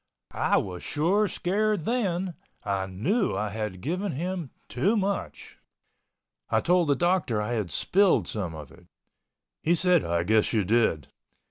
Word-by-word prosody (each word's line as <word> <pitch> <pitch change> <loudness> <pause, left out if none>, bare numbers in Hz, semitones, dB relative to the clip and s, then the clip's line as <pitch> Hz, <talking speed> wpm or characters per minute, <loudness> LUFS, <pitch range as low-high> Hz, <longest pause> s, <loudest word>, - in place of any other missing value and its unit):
I - - +2
was 90 -2 -3
sure 190 +8 +1
scared 205 +2 0
then, 190 -4 -1 0.3
I 100 -2 -1
knew 170 - 0
I 105 0 -1
had 105 -3 -5
given 185 +6 -2
him 175 +1 -3 0.2
too 195 - +1
much. 200 -1 -3 0.9
I - - +3
told 175 -1 +2
the 140 - +3
doctor 175 - +1
I 105 +2 -2
had 105 -6 -2
spilled 195 - +2
some 90 -7 -4
of 75 -4 -10
it. - - -18 0.7
He 170 - +2
said, 180 -1 +3
"I 85 0 0
guess 110 +5 +2
you 110 -3 +2
did!" 100 - +1
155 Hz, 150 wpm, -27 LUFS, -, 0.9 s, I